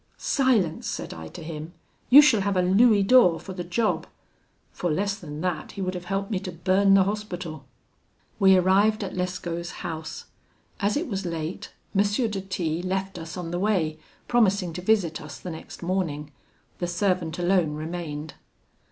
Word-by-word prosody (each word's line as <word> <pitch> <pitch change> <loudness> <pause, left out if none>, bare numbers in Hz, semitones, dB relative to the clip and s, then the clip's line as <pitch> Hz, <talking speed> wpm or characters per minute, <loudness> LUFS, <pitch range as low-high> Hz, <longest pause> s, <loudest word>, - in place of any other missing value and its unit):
'Silence!' 235 - +1
said - - -4
I 80 0 -8
to 160 - -10
him, 155 +1 -7 0.4
'you 285 +4 +10
shall 235 -9 +4
have 200 -1 0
a 180 - +3
louis 205 +3 +5
d'or 195 -6 +5
for 190 - -8
the 180 -1 -5
job': 215 +6 0 0.6
for 175 - -2
less 200 +5 0
than 155 -6 -8
that 180 -3 -3
he 195 - -6
would 185 0 -2
have 180 -1 -6
helped 195 +3 -2
me 195 - 0
to 185 -1 -6
burn 190 +4 +3
the 195 - +6
Hospital. 180 -7 -4 0.7
"We 190 -1 +6
arrived 200 +4 +3
at 190 - -5
Lescaut's 175 -2 -3 0.2
house. 160 -1 -5 0.5
As 205 +5 +1
it 325 - -2
was 195 -5 -3
late, 165 -1 -4 0.2
M. 195 - +5
de 205 0 0
T 175 -4 -2
left 190 0 -3
us 165 +2 -7
on 170 -2 -5
the 175 - -2
way, 175 -6 0 0.3
promising 200 -7 +2
to 180 - -5
visit 185 -5 +1
us 150 -2 -9
the 180 - -6
next 160 +2 -9
morning. 165 -5 -2 0.5
The 175 - -1
servant 175 -2 0
alone 175 -4 +2
remained. 155 -1 -5
185 Hz, 175 wpm, -25 LUFS, 165-200 Hz, 0.7 s, you